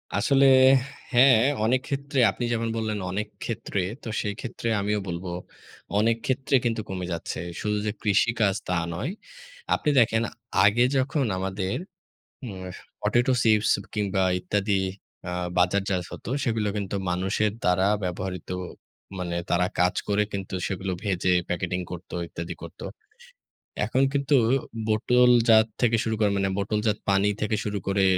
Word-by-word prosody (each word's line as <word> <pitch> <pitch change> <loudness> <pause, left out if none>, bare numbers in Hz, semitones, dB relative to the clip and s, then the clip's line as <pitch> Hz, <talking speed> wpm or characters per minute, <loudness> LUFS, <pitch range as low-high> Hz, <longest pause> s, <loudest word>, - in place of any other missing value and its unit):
আসলে 140 -1 +4 0.7
হ্যাঁ, 125 -1 +7 0.3
অনেক 125 +3 +2
ক্ষেত্রে 140 -1 -2
আপনি 120 - -6
যেমন 115 0 -1
বললেন 110 -2 -2
অনেক 105 +3 -2 0.2
ক্ষেত্রে, 105 -3 -3 0.2
তো - - -7
সেইক্ষেত্রে 110 +3 -5
আমিও 105 +1 0
বলব, 85 +1 -4 0.7
অনেক 115 +2 +2
ক্ষেত্রে 135 +1 +1
কিন্তু 115 -1 0
কমে 90 -1 -3
যাচ্ছে। 85 -1 -4 0.2
শুধু 105 0 0
যে, 105 - 0
কৃষিকাজ 105 0 +2
তা 90 - 0 0.2
নয়। 90 - -3 0.6
আপনি - - -1
দেখেন 110 -1 +3 0.4
আগে 110 +4 +4
যখন 135 +1 +1
আমাদের 95 +1 -2 0.7
উম 95 -6 -7 0.3
পটেটো 120 +2 +2
চিপস 110 -1 +3 0.2
কিংবা 100 -2 0 0.2
ইত্যাদি 100 +2 0 0.5
আ - - -3 0.3
বাজারজাত 95 +1 +1
হত, - - -9 0.2
সেগুলো 110 -3 0
কিন্তু 100 -1 -3
মানুষের 95 +4 0
দ্বারা 90 +1 +3 0.2
ব্যবহৃত 90 0 -4 0.7
মানে 90 -1 -3
তারা 90 +1 +3
কাজ 90 0 +3
করে 105 0 +2
কিন্তু 95 -1 -5
সেগুলো 95 0 -3
ভেজে 95 -2 +1 0.2
প্যাকেটিং 90 0 -2
করত 90 +1 -8 0.2
ইত্যাদি 85 0 -6
করত। - - -12 1.1
এখন 130 - +1
কিন্তু 140 0 +1 0.5
বোতলজাত 115 0 +5
থেকে 115 -2 +3
শুরু 110 - -1
করে 105 - +3
মানে 100 0 +1
বোতলজাত 105 +1 0
পানি 100 +1 +3
থেকে 105 0 0
শুরু 105 -1 -2
করে 100 0 +1
105 Hz, 135 wpm, -25 LUFS, 95-115 Hz, 1.1 s, হ্যাঁ